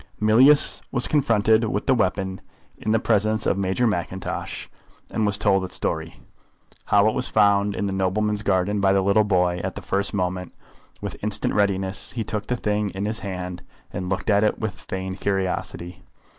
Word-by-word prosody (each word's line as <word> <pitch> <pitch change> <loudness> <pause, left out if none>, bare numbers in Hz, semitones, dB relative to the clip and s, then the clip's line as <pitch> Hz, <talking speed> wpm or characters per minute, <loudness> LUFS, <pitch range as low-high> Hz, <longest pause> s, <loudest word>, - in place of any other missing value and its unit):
Mealyus 125 +7 +5
was 120 - 0
confronted 115 -6 +3
with 105 -1 -2
the 135 - +4
weapon 95 -4 -1 0.4
in 110 - -2
the 110 - +4
presence 110 -1 +1
of - - +2
Major 95 +5 0
Mackintosh, 95 -3 -3 0.4
and 110 -2 0
was 100 - +2
told 95 -2 +2
its 90 - -6
story; - - -3 0.7
how 100 +1 +4
it 110 - +2
was - - 0
found 100 -1 +3
in 100 - -2
the 100 - -2
nobleman's 105 +2 0
garden 100 0 0
by 95 0 +3
the 95 -1 +2
little 100 +2 +3
boy. 90 -3 +1
At - - -4
the - - -7
first 100 +1 0
moment, 90 -2 -3 0.5
with - - -5
instant 105 0 0
readiness, 95 -1 0
he 115 - -2
took 105 -1 -4
the 125 - 0
thing 105 -2 -1
in 95 +1 -2
his 110 +2 -2
hand, 90 -3 -6 0.3
and 90 0 -4
looked 95 +2 -1
at 100 +1 +3
it 105 - +1
with 110 -4 -3
feigned 95 0 -6
curiosity. 90 -2 -3
100 Hz, 185 wpm, -23 LUFS, 95-110 Hz, 0.7 s, Mealyus